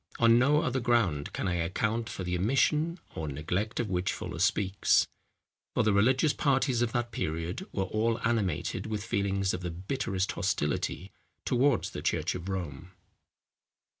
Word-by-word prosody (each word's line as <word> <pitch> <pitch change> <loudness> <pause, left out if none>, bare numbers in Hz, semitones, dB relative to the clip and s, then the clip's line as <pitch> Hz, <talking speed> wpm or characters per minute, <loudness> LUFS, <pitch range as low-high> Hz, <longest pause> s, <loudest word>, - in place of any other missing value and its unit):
On 115 0 +6
no 145 +4 +4
other 130 -2 0
ground 115 - +1
can - - -3
I 90 -1 0
account 110 +7 -1
for 95 - -5
the 90 0 -1
omission 150 - +2 0.2
or 80 - -4
neglect 90 +10 -2
of 120 - 0
which 90 0 0
Fuller 85 - -6
speaks; 100 0 +3 0.7
for - - +3
the 105 - +3
religious 130 +8 +3
parties 135 -3 +1
of 120 -2 +1
that 120 -1 -1
period, 80 -1 -3
were 95 - -1
all 110 +4 0
animated 110 -4 0
with 105 -2 -3
feelings 100 -2 0
of 90 - -3
the 90 - -3
bitterest 95 +1 -2
hostility 90 +1 -1 0.3
towards 135 +3 +2
the - - -6
church 80 +2 0
of 90 +1 -6
Rome. 90 -2 -5
100 Hz, 160 wpm, -29 LUFS, 90-120 Hz, 0.7 s, On